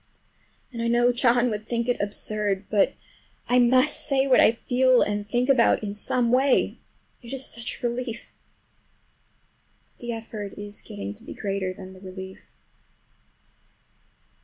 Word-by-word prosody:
And 230 - -4
I 230 - 0
know 240 +1 +3
John 240 -1 +3
would 215 +1 -5
think 235 0 -1
it 245 - 0
absurd. 205 -1 -2
But 205 -2 +3 0.5
I 250 +1 +4
must 255 +4 +4
say 275 -2 +2
what 270 - +5
I - - +7
feel 250 +2 +3
and 205 0 -3
think 245 +2 +1
in 230 -6 +3
some 235 +3 0
way—it 255 -2 -1
is 270 -1 -3
such 235 -1 -6
a - - +3
relief! 240 -1 -5 1.6
But - - -28
the 240 -1 -4
effort 220 -3 -7
is 205 0 -7
getting 100 0 -7
to 100 - -15
be - - -9
greater 195 -2 -2
than 185 0 -10
the 185 - -14
relief. 190 0 -10
235 Hz, 145 wpm, -25 LUFS, 205-245 Hz, 1.6 s, I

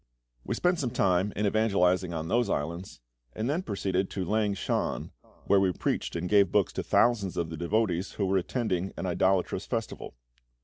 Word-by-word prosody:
We - - -2
spent 180 -1 +1
some 130 - -1
time 95 -4 +1
in 105 - 0
evangelising 95 -4 +2
on 80 -1 -4
those 120 +2 +1
islands, 85 0 -3 0.3
and 110 - -3
then 155 +6 0
proceeded 95 - -1
to 95 -2 -3
Lang 105 +1 +1
shan, - - -2 0.3
where 100 - +4
we 95 -1 +3
preached - - -2
and 85 +1 -2
gave 100 0 +4
books 105 -3 +2
to - - -2
thousands 105 -6 +2
of 85 -1 -2
the - - -4
devotees 95 +1 0
who 100 - -1
were 95 0 +2
attending 95 -1 -1
an - - -3
idolatrous 95 +1 +1
festival. 115 -2 -4
95 Hz, 180 wpm, -28 LUFS, 90-110 Hz, 0.3 s, where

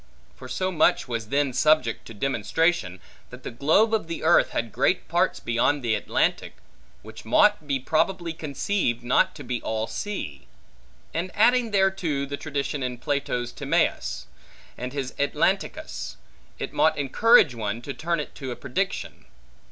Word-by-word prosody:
For 130 - -11
so 185 +8 -2
much 155 -5 +2
was 115 -3 -3
then 140 -1 +1
subject 130 -4 +2
to 115 - -10
demonstration, 135 - 0 0.3
that 125 +1 -12
the - - -5
globe 160 - +3
of 215 -6 0
the 165 - -5
earth - - +5
had - - -3
great - - +1
parts - - +1
beyond 120 +4 +1
the 115 -2 +1
Atlantic, - - 0 0.5
which 110 +1 -11
mought 155 - +3
be 140 -2 0
probably 170 +5 0
conceived 145 - -2
not 125 +2 +2
to - - -9
be 120 -2 -3
all 110 0 -2
sea: 115 - -5 0.7
and 170 +3 -2
adding 240 +2 +4
thereto 190 -8 +1
the 140 +1 -4
tradition 145 -1 -3
in 125 -1 -3
Plato's 125 -3 -2
Timaeus, - - -1 0.5
and 125 +1 -5
his 135 -2 -4
Atlanticus, 140 0 -1 0.4
it - - -5
mought - - +3
encourage 155 - +5
one 110 -1 -3
to 140 - -5
turn 170 +2 -1
it 150 - -5
to 135 -2 -7
a 125 - -4
prediction. 140 - -3
140 Hz, 155 wpm, -25 LUFS, 120-170 Hz, 0.7 s, earth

